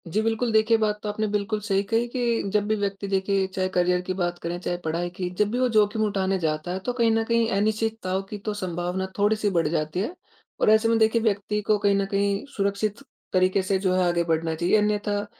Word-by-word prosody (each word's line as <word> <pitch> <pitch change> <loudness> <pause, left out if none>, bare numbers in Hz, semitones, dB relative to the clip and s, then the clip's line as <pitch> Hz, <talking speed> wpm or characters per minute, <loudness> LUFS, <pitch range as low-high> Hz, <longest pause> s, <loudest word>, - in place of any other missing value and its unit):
जी, 200 +6 0
बिल्कुल। 225 +2 0
देखिए 220 +1 +4
बात 210 -1 0
तो 210 - -2
आपने 215 +1 -1
बिल्कुल 210 +1 -1
सही 195 -2 +1
कही 230 +1 +1
कि 240 -2 0
जब 205 -1 +1
भी 215 - +2
व्यक्ति 200 -1 -3
देखिए 195 0 +1
चाहे 185 0 -2
करियर 180 0 +1
की 185 +1 -3
बात 175 -2 -2
करें 170 +1 -3
चाहे 175 0 -3
पढ़ाई 170 +2 -1
की 180 -1 -3
जब 210 0 +2
भी 245 - -1
वो 255 - +3
जोखिम 215 -1 +2
उठाने 195 -2 0
जाता 155 +1 -2
है 190 - -3
तो 245 - -1
कहीं 235 -2 +2
न 225 0 +2
कहीं 230 0 +1
अनिश्चितताओं 215 -2 -1
की 210 - -5
तो 215 - -1
संभावना 180 -1 -3
थोड़ी-सी 210 +1 +2
बढ़ 170 -5 +1
जाती 155 +2 -1
है। 235 - -3 0.5
और - - +4
ऐसे 220 +1 +5
में 230 - +3
देखिए 220 +1 +3
व्यक्ति 210 -1 0
को 215 - +4
कहीं 200 -1 +2
न 195 0 +1
कहीं 200 +1 0
सुरक्षित 200 +1 -1 0.3
तरीके 185 +1 +3
से 190 +1 +1
जो 185 -1 +1
है 185 - +3
आगे 175 0 +1
बढ़ना 165 -1 0
चाहिए 175 +5 +2
अन्यथा 210 -1 0
200 Hz, 230 wpm, -25 LUFS, 185-215 Hz, 0.5 s, ऐसे